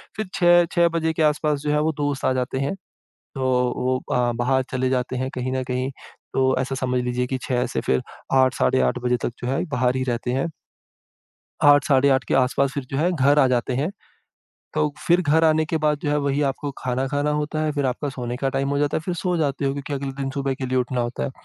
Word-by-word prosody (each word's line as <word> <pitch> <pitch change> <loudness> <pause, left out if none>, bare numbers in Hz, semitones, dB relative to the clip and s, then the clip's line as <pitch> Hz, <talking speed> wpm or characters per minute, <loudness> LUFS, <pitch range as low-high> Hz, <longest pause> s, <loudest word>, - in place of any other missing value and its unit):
फिर 215 -1 -3
6-6 175 -1 +4
बजे 165 -1 0
के 160 - -2
आस-पास 150 -1 +1
जो 150 - -2
है 150 - +2
वो 160 - +1
दोस्त 145 -2 -1
आ 130 - +3
जाते 130 0 -2
हैं। 140 +7 -1 0.6
तो 135 - -3 0.3
वो 130 +1 +1
अ, 120 -1 +2
बाहर 130 +3 +1
चले 130 0 0
जाते 130 0 -1
हैं 130 +1 -2
कहीं 130 0 -2
न 130 - -1
कहीं 125 +1 -2 0.4
तो 135 - +2 0.2
ऐसा 135 +1 -2
समझ 125 -1 -1
लीजिए 125 0 -1
की 130 +1 -2
6 125 -1 0
से - - -2
फिर 65 - +1 0.4
8 130 -1 +4
साढ़े 130 0 +2
8 - - -3
बजे 125 0 +2
तक - - -1
जो 125 - -3
है, 135 +6 0
बाहर 125 -2 +1
ही 130 - 0
रहते 125 -1 -2
हैं। 135 +6 0 1.1
8 145 -1 +6
साढ़े 140 -1 +4
8 130 -1 +2
के - - +1
आस-पास 135 +1 +2
फिर 140 - -3
जो 135 - -2
है 165 +5 +2
घर 145 -1 +3
आ 135 - +6
जाते 125 0 0
हैं। 145 +7 0 0.8
तो 150 - +2 0.2
फिर 175 +1 +4
घर 160 0 +3
आने 155 0 +4
के 160 +1 -2
बाद 150 -1 +2
जो - - -1
है 145 - +2
वही 140 0 0
आपको 140 +1 -2
खाना, 130 +1 -1
खाना 145 +1 0
होता 150 +1 -1
है, 155 - +1
फिर 145 -2 0
आपका 130 +3 -2
सोने 125 -3 -4
का 135 +1 -1
टाइम 135 0 0
हो 140 - 0
जाता 145 +1 +1
है, - - -1
फिर 175 +3 -3
सो 180 +1 -1
जाते 145 -3 -1
हो 135 - +1
क्योंकि 140 +1 -6
अगले 140 0 -3
दिन 135 - -2
सुबह 135 0 -2
के 130 0 -5
लिए 130 0 0
उठना 125 0 -1
होता 120 0 -2
है। - - -3
135 Hz, 245 wpm, -23 LUFS, 130-150 Hz, 1.1 s, 8